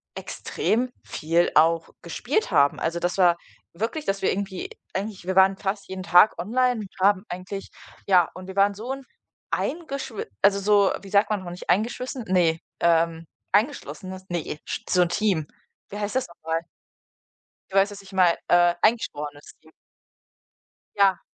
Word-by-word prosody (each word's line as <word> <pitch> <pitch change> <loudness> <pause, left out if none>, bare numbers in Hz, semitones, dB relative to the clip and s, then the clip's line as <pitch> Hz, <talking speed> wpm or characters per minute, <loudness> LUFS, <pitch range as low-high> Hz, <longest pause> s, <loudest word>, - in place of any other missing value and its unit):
extrem 245 +3 -2
viel 165 +3 +1
auch 165 +1 +4
gespielt 435 - -1
haben. 140 0 +4
Also, 170 +1 -1
das 175 +2 -1
war 175 -2 +5 0.4
wirklich, 230 - -3
dass 195 0 -1
wir - - +3
irgendwie 195 -1 -4 0.3
eigentlich 195 -1 -4
wir 190 - -1
waren 190 0 +5
fast 200 +1 -3
jeden 190 0 -5
Tag 180 +3 +5
online 245 +5 +1
und 200 - -8 0.2
haben 200 -1 +2
eigentlich 185 +2 -6 0.4
ja, 180 -4 +5
und 185 0 -10
wir 190 - -8
waren 200 +1 +4
so 230 +6 -5
'n 270 0 -9 0.5
eingeschwi 275 - -3 0.2
also, 200 0 +5
so, 200 0 +4
wie 195 - -11
sagt 200 +1 +3
man 205 -3 0
noch, 175 - -7
nicht 180 - -10
eingeschwissen? 240 +5 -1
Ne, 170 -3 +2 0.2
ähm, 165 -1 +2 0.3
eingeschlossenes, 190 -5 -1
ne, 165 -3 -3
sch - - -4
so 180 - +4
'n 175 - -1
Team. 175 -5 0 0.4
Wie 205 - -7
heißt 205 +3 -3
das 260 - 0
noch 170 - -17
mal? 160 +1 0 1.1
Du 195 - -4
weißt, 195 +1 +4
was 200 -1 -10
ich 190 - -15
meine, 180 -3 +4
äh, 175 0 +5
eingeschworenes 150 -10 -1
Team. 160 - -20 1.3
Ja. 195 -2 +4
190 Hz, 165 wpm, -25 LUFS, 175-210 Hz, 1.3 s, war